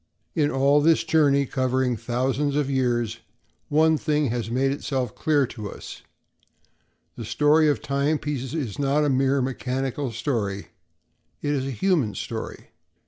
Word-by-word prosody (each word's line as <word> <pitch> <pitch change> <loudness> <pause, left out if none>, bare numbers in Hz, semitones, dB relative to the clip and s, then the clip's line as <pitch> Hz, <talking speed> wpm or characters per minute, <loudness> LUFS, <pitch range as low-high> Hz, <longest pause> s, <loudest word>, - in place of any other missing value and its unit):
In 145 -2 +2
all 140 +2 +3
this 160 +2 +4
journey, 145 -3 +3
covering 130 -1 0
thousands 130 +5 -1
of 145 -2 0
years, 120 -4 0 0.5
one 155 +1 +3
thing 150 -4 0
has 120 -2 -3
made 130 +3 +1
itself 135 -4 -2
clear 150 -3 +2
to 110 -4 -7
us—the - - -10 1.2
story 150 +1 +3
of 145 - -1
timepieces 140 -1 -1
is 130 -10 -4
not 145 +2 +2
a - - +2
mere 135 0 +2
mechanical 130 +1 -2
story; 110 -4 -3 0.7
it 145 - 0
is 135 -2 -1
a - - -2
human 135 - 0
story. - - -6
135 Hz, 140 wpm, -24 LUFS, 125-150 Hz, 1.2 s, this